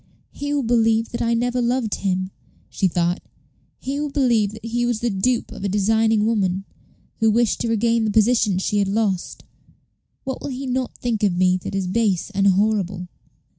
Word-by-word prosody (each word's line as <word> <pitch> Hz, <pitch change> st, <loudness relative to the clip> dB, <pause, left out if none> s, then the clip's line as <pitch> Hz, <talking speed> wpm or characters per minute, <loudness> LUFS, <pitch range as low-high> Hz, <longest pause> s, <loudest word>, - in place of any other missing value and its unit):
"He 285 Hz, 0 st, -5 dB
will 290 Hz, -2 st, 0 dB
believe 225 Hz, -1 st, +2 dB
that 235 Hz, -, -4 dB
I 235 Hz, 0 st, +1 dB
never 245 Hz, +1 st, 0 dB
loved 240 Hz, -2 st, 0 dB
him," 185 Hz, -1 st, -1 dB, 0.4 s
she 190 Hz, -, +1 dB
thought. 175 Hz, +1 st, 0 dB, 0.6 s
"He 275 Hz, +2 st, -4 dB
will 295 Hz, 0 st, -2 dB
believe 240 Hz, -8 st, +2 dB
that 220 Hz, +1 st, -10 dB
he 240 Hz, +1 st, -1 dB
was 240 Hz, -2 st, 0 dB
the 235 Hz, 0 st, -1 dB
dupe 230 Hz, +5 st, 0 dB
of -, -, -8 dB
a 200 Hz, -, 0 dB
designing 220 Hz, +2 st, +2 dB
woman, 195 Hz, -4 st, 0 dB, 0.5 s
who 225 Hz, -1 st, +3 dB
wished 230 Hz, +1 st, +1 dB
to 235 Hz, -, -1 dB
regain 230 Hz, 0 st, +1 dB
the -, -, +1 dB
position 215 Hz, -2 st, +3 dB
she 205 Hz, +2 st, 0 dB
had 200 Hz, -, +1 dB
lost. 200 Hz, -3 st, -1 dB, 0.8 s
What 265 Hz, -1 st, -5 dB
will -, -, -5 dB
he 265 Hz, +1 st, -5 dB
not 255 Hz, 0 st, -2 dB
think 235 Hz, -3 st, -2 dB
of 195 Hz, -4 st, +1 dB
me 185 Hz, 0 st, +3 dB
that 185 Hz, -, -6 dB
is 195 Hz, -1 st, -1 dB
base 200 Hz, 0 st, 0 dB
and 200 Hz, 0 st, +2 dB
horrible?" 195 Hz, -2 st, +1 dB
220 Hz, 190 wpm, -22 LUFS, 195-240 Hz, 0.8 s, who